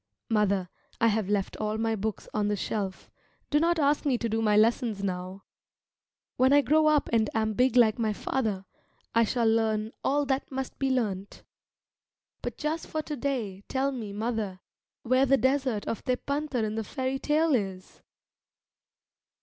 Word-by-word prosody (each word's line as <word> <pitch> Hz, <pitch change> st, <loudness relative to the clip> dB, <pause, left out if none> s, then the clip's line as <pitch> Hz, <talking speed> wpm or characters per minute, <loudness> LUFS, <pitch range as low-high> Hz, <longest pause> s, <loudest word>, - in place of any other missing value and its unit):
Mother, 200 Hz, -4 st, +2 dB, 0.3 s
I 230 Hz, -, +4 dB
have 210 Hz, -2 st, 0 dB
left 205 Hz, -2 st, 0 dB
all 215 Hz, 0 st, -2 dB
my 225 Hz, 0 st, 0 dB
books 220 Hz, +1 st, -4 dB
on 210 Hz, -1 st, +1 dB
the 205 Hz, -, +1 dB
shelf 195 Hz, -1 st, -4 dB, 0.4 s
do 295 Hz, -, +4 dB
not 340 Hz, +2 st, +2 dB
ask 290 Hz, -1 st, +2 dB
me 270 Hz, -4 st, +2 dB
to 235 Hz, -, -2 dB
do 225 Hz, 0 st, -1 dB
my 210 Hz, -1 st, +3 dB
lessons 220 Hz, -2 st, +2 dB
now. 185 Hz, 0 st, -4 dB, 0.9 s
When 260 Hz, +1 st, +4 dB
I 290 Hz, -, +7 dB
grow 310 Hz, +4 st, +3 dB
up 305 Hz, -1 st, +3 dB
and 220 Hz, -2 st, +3 dB
am 220 Hz, -1 st, +1 dB
big 250 Hz, +4 st, +2 dB
like 230 Hz, -2 st, +5 dB
my 220 Hz, -2 st, +1 dB
father, 210 Hz, -3 st, -2 dB, 0.5 s
I 230 Hz, -, +5 dB
shall 235 Hz, +1 st, 0 dB
learn 220 Hz, -1 st, +1 dB
all 290 Hz, +1 st, +2 dB
that 270 Hz, 0 st, -1 dB
must 265 Hz, -1 st, -5 dB
be 270 Hz, -, +1 dB
learnt. 205 Hz, -6 st, -2 dB, 1.0 s
But -, -, -5 dB
just 310 Hz, +2 st, -2 dB
for 310 Hz, 0 st, -3 dB
to 300 Hz, -, -4 dB
day, 235 Hz, -8 st, -3 dB
tell 270 Hz, +1 st, 0 dB
me, 230 Hz, -6 st, -5 dB
mother, 210 Hz, -3 st, -3 dB, 0.4 s
where 255 Hz, +3 st, +3 dB
the 275 Hz, +1 st, +5 dB
desert 260 Hz, -5 st, +1 dB
of 230 Hz, -, -3 dB
Tepântar 280 Hz, 0 st, -1 dB
in 215 Hz, 0 st, -1 dB
the 220 Hz, 0 st, -2 dB
fairy 260 Hz, +3 st, -3 dB
tale 310 Hz, +2 st, +2 dB
is? 195 Hz, -6 st, -3 dB
230 Hz, 170 wpm, -28 LUFS, 210-270 Hz, 1.0 s, I